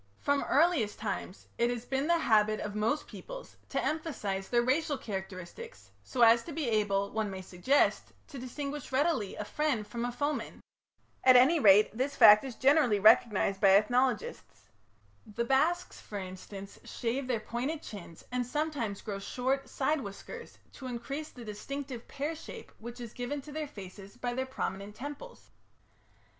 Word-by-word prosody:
From 285 0 +1
the - - -4
earliest 290 -9 +3
times 210 -3 -5
it 235 +1 +3
has 245 -1 -3
been 270 +3 -1
the 340 0 +4
habit 215 -7 +3
of 210 - -4
most 220 +8 0
peoples - - -10
to - - -1
emphasize 220 -12 -3
their 240 -1 +3
racial 285 +3 +1
characteristics 190 - -7
so 245 -2 +1
as 230 +1 +7
to 335 - -7
be 305 -3 -2
able, 200 -3 +1
one 220 -1 -1
may 190 -1 -6
suggest, 185 +11 +1 0.2
to 280 -4 -8
distinguish 280 +3 -5
readily 265 - +1
a 210 - -5
friend 285 -5 -1
from 235 +1 -4
a 245 - -1
foeman. 290 +4 -3 0.6
At 255 -1 +7
any 275 +7 +6
rate 210 -3 +6
this 270 +4 -1
fact 210 0 +9
is 260 -4 -6
generally 265 -5 +4
recognized 210 -2 +4
by 195 -1 +7
ethnologists. 240 - -1 0.6
The 225 +3 -3
Basques, 320 +8 +1
for 205 - -7
instance, 195 +1 -8
shave 250 +3 -3
their 245 -3 0
pointed 260 +8 -3
chins 175 -5 -10
and 250 0 0
sometimes 250 -6 -2
grow 200 -2 -4
short 260 +6 -2
side 285 +2 0
whiskers 215 - -9
to 260 - -9
increase 275 +5 -5
the 245 -2 -11
distinctive 255 +4 -6
pear 295 +3 -3
shape 320 - -10
which 235 +2 -8
is 235 -3 -8
given 245 +4 -3
to 300 - -10
their 305 0 -4
faces 200 -3 -11
by 245 0 -2
their 260 +1 -2
prominent 200 -5 -4
temples. 290 - -9
245 Hz, 165 wpm, -31 LUFS, 210-285 Hz, 0.6 s, fact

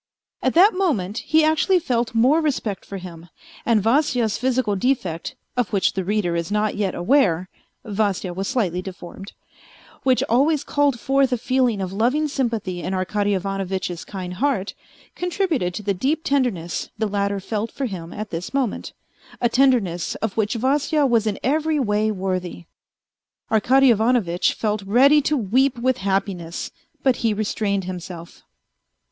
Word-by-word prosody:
At 260 - 0
that 390 +6 +7
moment 245 - 0
he 315 0 +2
actually 315 +5 +3
felt 245 -8 -1
more 260 +8 +4
respect 255 -10 -2
for 200 - -6
him, 175 -2 -10 0.4
and 225 -4 +3
Vasya's 240 -2 +2
physical 250 -4 0
defect, 190 -7 -1 0.2
of 245 -4 0
which 195 -2 +2
the 190 - -2
reader 190 -3 0
is 170 +2 -3
not 210 0 0
yet 200 -3 -1
aware 185 - +2 0.4
(Vasya 200 -4 -1
was 195 +2 -3
slightly 190 -9 0
deformed), 190 +1 -9 0.7
which 260 -1 +2
always 285 +5 +2
called 285 -4 +1
forth 270 +2 +2
a 250 - +1
feeling 245 -3 +1
of 185 0 -4
loving 255 +9 +1
sympathy 225 -10 -2
in 190 - -3
Arkady 200 +2 0
Ivanovitch's 190 -2 -3
kind 185 -3 -6
heart, 230 -2 -1 0.4
contributed 350 - -1
to 210 - -5
the 200 0 0
deep 285 - -1
tenderness 245 - -1
the 220 - 0
latter 200 -1 -1
felt 215 +3 -3
for 275 - -3
him 175 -7 -6
at 215 0 -6
this 170 +10 -5
moment, 260 -6 -2 0.5
a 240 - +2
tenderness 230 -10 +2
of 220 -3 -3
which 215 +1 0
Vasya 285 +5 +1
was 230 -4 +2
in 210 - -1
every 305 +3 +1
way 215 -3 +1
worthy. 185 -3 -3 0.9
Arkady 255 +4 +5
Ivanovitch 220 -6 +2
felt 215 -1 -1
ready 260 +9 +5
to 295 +1 0
weep 255 +4 +2
with 255 +1 +1
happiness, 190 -3 -2 0.3
but 260 -3 +3
he 225 -2 0
restrained 205 -2 -1
himself. 180 -2 -8
215 Hz, 155 wpm, -22 LUFS, 190-265 Hz, 0.9 s, that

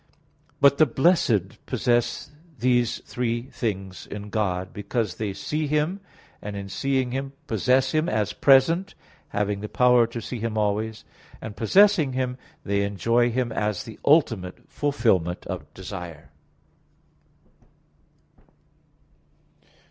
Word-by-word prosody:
But 140 0 +5
the 155 - +6
blessed 120 - +1
possess 120 +2 0 0.3
these 120 -2 +1
three 120 -1 -2
things 100 -8 -5
in 105 0 -8
God; 95 -4 -1
because 105 -1 -2
they 105 -2 -2
see 150 +10 -3
Him, 150 +6 0 0.4
and 105 0 -6
in 100 -1 -6
seeing 130 +2 -1
Him, 135 +1 -4
possess 130 +4 +2
Him 155 +1 +1
as 105 -1 0
present, 155 +8 +4 0.3
having 105 -1 -1
the 105 - -5
power 125 -2 +4
to 115 0 -6
see 115 +2 -6
Him 110 0 -3
always; 105 +1 -1 0.3
and 105 -2 -8
possessing 175 - +4
Him, 130 0 -2 0.2
they 100 0 0
enjoy 115 +4 +1
Him 120 0 -1
as 105 -3 -1
the 115 - -11
ultimate 115 - +2
fulfilment 110 - 0
of 75 +1 -6
desire. 90 -4 -8
115 Hz, 120 wpm, -25 LUFS, 100-130 Hz, 0.4 s, the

